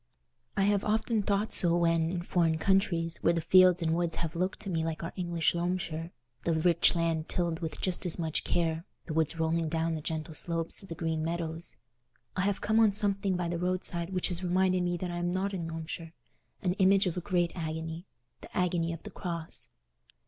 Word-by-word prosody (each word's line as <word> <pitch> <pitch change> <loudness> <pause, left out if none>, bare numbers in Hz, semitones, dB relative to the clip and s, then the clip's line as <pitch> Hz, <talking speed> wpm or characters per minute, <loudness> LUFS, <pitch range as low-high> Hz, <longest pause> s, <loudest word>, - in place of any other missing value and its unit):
I 195 - +3
have 205 0 +2
often 220 +1 +1
thought 200 +2 0
so 170 -1 +6
when, 165 -1 +2
in 175 0 -3
foreign 165 -3 +1
countries, 170 -2 +1
where 170 - +3
the 170 - 0
fields 180 +1 +5
and 160 0 +1
woods 170 0 0
have 165 0 -4
looked 185 +2 -1
to 205 - -4
me 165 -2 0
like 165 0 -3
our 165 - -5
English 175 -3 0
Loamshire—the 165 -6 -3
rich 170 +2 +3
land 165 -1 0
tilled 170 -2 -1
with 160 -2 -5
just 185 -2 0
as 170 - +1
much 160 -3 -1
care, 165 -1 0 0.2
the 160 - -5
woods 160 +1 0
rolling 160 0 +1
down 165 +1 0
the 155 - -3
gentle 160 +1 -4
slopes 165 +1 -1
to 195 - -3
the 165 - -6
green 160 -1 -2
meadows—I 160 -5 -6
have 195 +1 0
come 220 +1 +2
on 220 -3 +5
something 200 -2 +4
by 175 -1 -1
the 170 0 -2
roadside 180 -1 -1
which 185 -2 -1
has 180 0 -2
reminded 185 +1 +2
me 175 0 0
that 180 0 -4
I 175 - -4
am 175 0 -1
not 195 +2 -1
in 170 -3 -3
Loamshire: 165 0 -6 0.5
an 180 -2 +1
image 195 +1 +5
of 180 - -1
a 180 - -3
great 175 -2 0
agony—the 160 -5 -7
agony 170 -2 +1
of 165 - -9
the - - -8
Cross. 170 -3 -3
170 Hz, 200 wpm, -30 LUFS, 165-185 Hz, 0.5 s, so